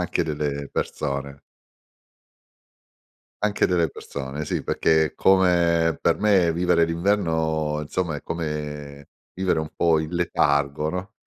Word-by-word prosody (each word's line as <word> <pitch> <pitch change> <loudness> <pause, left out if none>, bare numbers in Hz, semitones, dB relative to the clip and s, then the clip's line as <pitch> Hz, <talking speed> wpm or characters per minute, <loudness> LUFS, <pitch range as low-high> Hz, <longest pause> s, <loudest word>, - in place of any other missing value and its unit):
anche 90 -1 0
delle 75 -2 -3
persone. 70 -1 -3 2.0
Anche 105 -1 +2
delle 85 -4 +1
persone 70 +2 -6
sì, - - -2
perché 80 -1 +2
come 85 -4 +3
per - - +2
me 95 -6 +3
vivere 85 -1 +3
l'inverno, 80 -4 0
insomma, 80 +2 -2
è - - -9
come 75 -3 -5 0.3
vivere 95 -3 0
un 80 - -4
po' 85 -2 +3
in 80 0 -3
letargo, 75 -3 +1
no. 90 +5 -5
80 Hz, 115 wpm, -24 LUFS, 75-90 Hz, 2.0 s, come